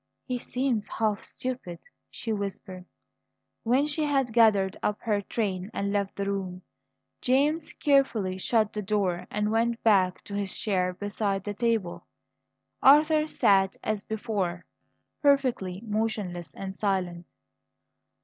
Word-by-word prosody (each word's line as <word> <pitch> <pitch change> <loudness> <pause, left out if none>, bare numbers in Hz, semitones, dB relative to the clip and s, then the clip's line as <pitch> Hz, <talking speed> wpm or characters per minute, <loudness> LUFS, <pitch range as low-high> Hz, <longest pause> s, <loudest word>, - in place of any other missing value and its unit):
"He 250 -2 -2
seems 250 -4 -1
half 215 -2 -1
stupid," 250 -9 -5 0.3
she 225 - -4
whispered. 190 -2 -5 0.8
When 255 +5 +2
she 300 +1 -1
had 270 -5 +1
gathered 210 -5 +4
up 210 - -1
her 210 -2 0
train 195 -3 -2
and 200 0 -1
left 200 -1 -1
the 200 - -2
room, 190 -2 -3 0.6
James 295 +5 +2
carefully 230 -10 +2
shut 215 +1 +1
the 210 - -2
door 190 -3 -1
and 210 0 -1
went 230 +1 0
back 190 -4 +3
to 200 - -9
his 200 -2 -2
chair 185 -3 0
beside 200 -1 -2
the 205 - -4
table. 225 -5 -1 0.7
Arthur 305 +2 +6
sat 195 -8 +3
as 215 -2 -1
before, 205 -6 -3 0.6
perfectly 250 -10 +2
motionless 205 -7 -3
and 190 -1 -5
silent. 185 -4 -2
210 Hz, 130 wpm, -27 LUFS, 190-235 Hz, 0.8 s, Arthur